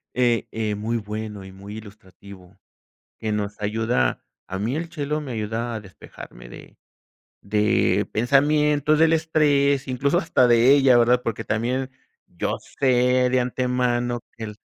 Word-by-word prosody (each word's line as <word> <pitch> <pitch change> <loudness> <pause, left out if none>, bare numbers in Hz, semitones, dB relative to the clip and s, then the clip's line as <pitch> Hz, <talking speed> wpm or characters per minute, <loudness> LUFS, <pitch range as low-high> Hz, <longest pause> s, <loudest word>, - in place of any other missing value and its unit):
eh, 120 -2 +1
eh, 110 -1 -2
muy 110 +3 -2
bueno 105 -2 -6
y 95 - -11
muy 100 +3 -10
ilustrativo, 100 -3 -14 0.6
que 110 - -3
nos 105 0 -3
ayuda 110 +3 -1 0.2
a 95 0 -5
mí 115 +7 -2
el 165 +2 -3
chelo 150 -2 -3
me 145 -4 -7
ayuda 115 +1 -3
a 110 - -4
despejarme 60 -10 -13
de - - -13 0.7
de 105 -1 +1
pensamientos, 150 +4 +2
del 160 0 +5
estrés, 145 -4 +2
incluso 140 +6 +1
hasta 130 -7 +2
de 120 +3 +5
ella, 135 -3 +5
¿verdad? 120 +1 +3
Porque 115 -3 -3
también 125 +4 -2 0.4
yo - - -3 0.2
sé 125 -1 +3
de 130 - +3
antemano 125 -1 -1 0.2
que 115 - -7
el 105 -1 -7
120 Hz, 145 wpm, -23 LUFS, 105-135 Hz, 0.7 s, del